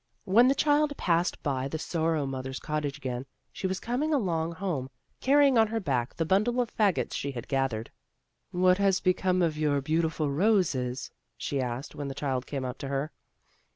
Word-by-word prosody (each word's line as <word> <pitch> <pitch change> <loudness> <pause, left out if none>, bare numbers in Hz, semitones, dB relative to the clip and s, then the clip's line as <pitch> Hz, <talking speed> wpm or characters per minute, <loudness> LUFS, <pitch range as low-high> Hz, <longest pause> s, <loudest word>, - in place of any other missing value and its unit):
When 230 +6 +6
the 270 - +3
child 295 -1 +2
passed 170 0 0
by 135 -3 -1
the 160 - -3
Sorrow 160 -2 0
mother's 130 0 -4
cottage 150 -2 -3
again, 130 -2 -4 0.3
she 190 - -2
was 190 0 -2
coming 255 +9 -1
along 170 - 0
home, 165 -8 -3 0.3
car 275 +2 +4
rying 275 -4 +5
on 220 - +5
her 225 +1 -2
back 130 - -1
the 165 - -1
bimdle 215 +8 +2
of 240 -2 -1
fagots 205 -5 +1
she 140 0 -3
had 120 -3 -6
gathered. 135 -5 -1 0.6
"What 180 +1 +3
has 195 -2 +3
become 185 0 +2
of 155 -2 0
your 145 -2 +2
beautiful 155 0 0
roses?" 140 - +1 0.3
she 140 -2 -2
asked, 125 +3 -4
when 145 - -5
the 135 - -5
child 130 -3 -2
came 135 -3 -3
up 125 0 -5
to 140 - -5
her. 140 +3 -2
160 Hz, 190 wpm, -28 LUFS, 135-195 Hz, 0.6 s, When